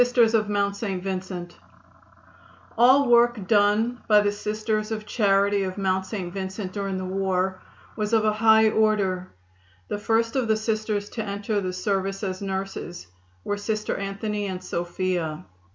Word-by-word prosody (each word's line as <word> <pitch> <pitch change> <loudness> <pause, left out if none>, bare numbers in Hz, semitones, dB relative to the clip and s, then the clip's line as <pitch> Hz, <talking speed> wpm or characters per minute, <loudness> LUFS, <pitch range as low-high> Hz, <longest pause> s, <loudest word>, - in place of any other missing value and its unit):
Labors 245 -2 +3 0.5
in 190 -5 -3
Kentucky. 185 -2 -5 1.2
The 255 +4 +6
work 240 -4 +4
done 215 +4 +2
by 210 -1 +6
the 205 0 +1
Sisters 215 +1 -2
of 215 -1 -3
Charity 200 -2 +2
of 185 0 -3
Mount 190 -1 0
St. 185 -4 -5
Vincent 190 0 -5
during 195 -2 -3
the 185 - -4
war 190 0 -1 0.3
was 210 0 -2
of 220 -1 +3
a 215 - +3
high 220 0 +5
order. 200 -4 +1 0.6
The 205 - -2
first 225 +3 +1
of 255 -3 +1
the 220 -1 +2
Sisters 215 -2 -1
to 225 - -4
enter 205 0 -2
the 185 -1 -2
service 195 +1 -2
as 185 -1 -3
nurses 190 - -5 0.4
were 205 - -2
Sisters 215 0 -2
Anthony 205 +1 -3
and 185 -1 -5
Sophia. 175 - -2
205 Hz, 150 wpm, -25 LUFS, 190-215 Hz, 1.2 s, The